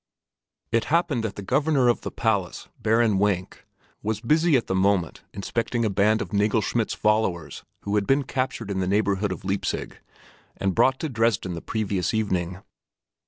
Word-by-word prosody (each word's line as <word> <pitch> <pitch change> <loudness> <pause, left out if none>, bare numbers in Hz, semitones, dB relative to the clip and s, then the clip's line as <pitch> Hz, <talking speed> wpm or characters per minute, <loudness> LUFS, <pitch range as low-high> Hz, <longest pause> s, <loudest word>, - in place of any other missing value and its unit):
It 115 -1 +2
happened 150 -7 +1
that 105 -3 -3
the 100 - -7
Governor 135 +3 +2
of 120 - +2
the - - -4
Palace, 100 -6 -1
Baron 110 -2 +2
Wenk, 95 -3 -1 0.4
was 110 0 -2
busy 155 +6 +3
at 120 - -2
the - - -2
moment 95 -2 +1
inspecting 115 +3 -2
a 105 - +1
band 105 +3 +2
of - - -10
Nagelschmidt's 105 +2 +1
followers 95 -9 0 0.2
who 100 - -4
had 105 -1 +1
been 135 +1 +3
captured 130 -6 -3
in 95 - -1
the 95 - 0
neighborhood 100 0 +1
of 95 - -6
Leipzig 95 +1 -2 0.6
and 95 -1 0
brought 130 +9 +3
to 160 - -1
Dresden 115 -6 0
the 85 - -5
previous 105 -2 -1
evening. 95 -4 -1
105 Hz, 165 wpm, -25 LUFS, 95-115 Hz, 0.6 s, busy